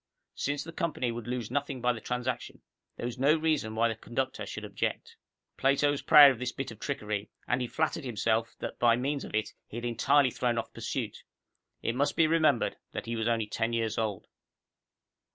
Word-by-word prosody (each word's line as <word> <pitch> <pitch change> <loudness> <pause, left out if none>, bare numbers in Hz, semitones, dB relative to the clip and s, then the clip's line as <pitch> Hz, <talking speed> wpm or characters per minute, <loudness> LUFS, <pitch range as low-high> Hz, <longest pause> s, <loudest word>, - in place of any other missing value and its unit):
Since 145 0 -2
the 165 - -8
company 150 -8 -1
would 115 -1 -6
lose 120 -2 -3
nothing 140 -1 -2
by 125 0 +2
the 110 - -8
transaction, 125 +1 -3 0.3
there - - -4
was 120 +1 -4
no 140 +4 +5
reason 155 -9 0
why 115 +1 +3
the 115 - -1
conductor 130 +4 -3
should - - -6
object. - - -3 0.4
Plato 140 +2 +3
was 145 - -2
proud 150 -3 +9
of 125 - -5
this 125 -1 -2
bit 135 -2 -5
of 110 - -11
trickery, 105 -6 -3 0.2
and 130 - +1
he 125 - -1
flattered 160 +4 -1
himself 115 -1 0
that - - -5
by 120 -1 +5
means 140 +3 -1
of - - -6
it 110 -1 -1
he 115 - -8
had 120 - -4
entirely 130 +3 +3
thrown 120 -1 0
off 115 - -3
pursuit. - - -4 0.6
It 115 - 0
must 140 +4 +1
be 165 - +5
remembered 155 -5 +2 0.2
that - - -4
he 115 - -3
was 110 0 -1
only 115 -2 +1
ten 115 +2 -2
years 115 -1 0
old. 105 -4 -2
120 Hz, 205 wpm, -30 LUFS, 115-140 Hz, 0.6 s, proud